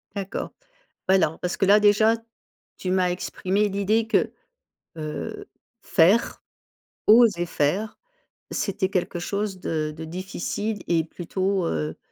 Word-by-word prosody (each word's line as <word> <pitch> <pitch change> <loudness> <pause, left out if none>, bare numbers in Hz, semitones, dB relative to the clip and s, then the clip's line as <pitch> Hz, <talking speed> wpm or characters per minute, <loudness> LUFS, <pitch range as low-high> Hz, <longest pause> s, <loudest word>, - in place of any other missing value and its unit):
D'accord, 195 -1 -4 0.6
ouais 190 - +6
len 160 -3 +1
parce 180 - -2
que - - +2
là 205 +2 +6
déjà, 210 +2 +5 0.6
tu 185 - -3
m'as 185 -1 +2
exprimé 190 +3 -1
l'idée 210 +3 +1
que, - - +2 0.7
heu, 155 - -5 0.3
faire, 195 +7 +3 0.6
oser 215 -6 +6
faire, 175 +7 -1 0.5
c'était 195 -1 -1
quelque 180 -2 -1
chose 200 +2 -3
de 155 -3 -2
de 160 +1 -7
difficile 190 +5 -4
et 165 -2 +2
plutôt, 185 +3 -2
heu, 75 0 -2
190 Hz, 125 wpm, -24 LUFS, 170-205 Hz, 0.7 s, ouais